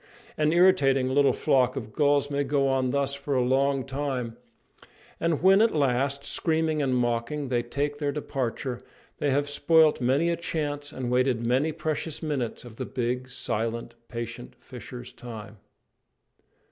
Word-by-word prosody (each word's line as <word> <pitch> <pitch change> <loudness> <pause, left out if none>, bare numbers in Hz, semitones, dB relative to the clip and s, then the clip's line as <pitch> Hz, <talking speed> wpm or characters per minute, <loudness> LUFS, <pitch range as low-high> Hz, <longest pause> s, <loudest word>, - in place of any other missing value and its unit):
An 155 0 +2
irritating 145 -8 +4
little 140 +1 +4
flock 130 -1 +2
of 110 -5 -6
gulls 145 +1 +2
may 140 0 +1
go 140 -1 +1
on 130 -1 +1
thus 140 +1 0
for 140 0 -3
a 125 - +3
long 135 +1 +1
time; 135 -4 -3 0.8
and 165 -1 0
when 195 +2 +6
at 225 -6 +3
last, 140 0 +1
screaming 160 -2 0
and 130 -2 +1
mocking, 125 +4 -1
they 120 -2 +1
take 145 +4 -3
their 145 -2 0
departure, 130 -3 -3 0.4
they 145 - +1
have 145 +2 +1
spoilt 155 0 +4
many 140 +7 +2
a - - +1
chance 145 -3 -3
and 130 -4 -4
wasted 125 -2 +1
many 130 +6 +2
precious 155 0 -3
minutes 135 -7 -3
of 115 -2 -12
the - - -3
big, 125 0 -2
silent, 115 -1 -3
patient 120 0 -7
fisher's 125 0 -9
time. 110 -3 -9
135 Hz, 155 wpm, -27 LUFS, 125-145 Hz, 0.8 s, when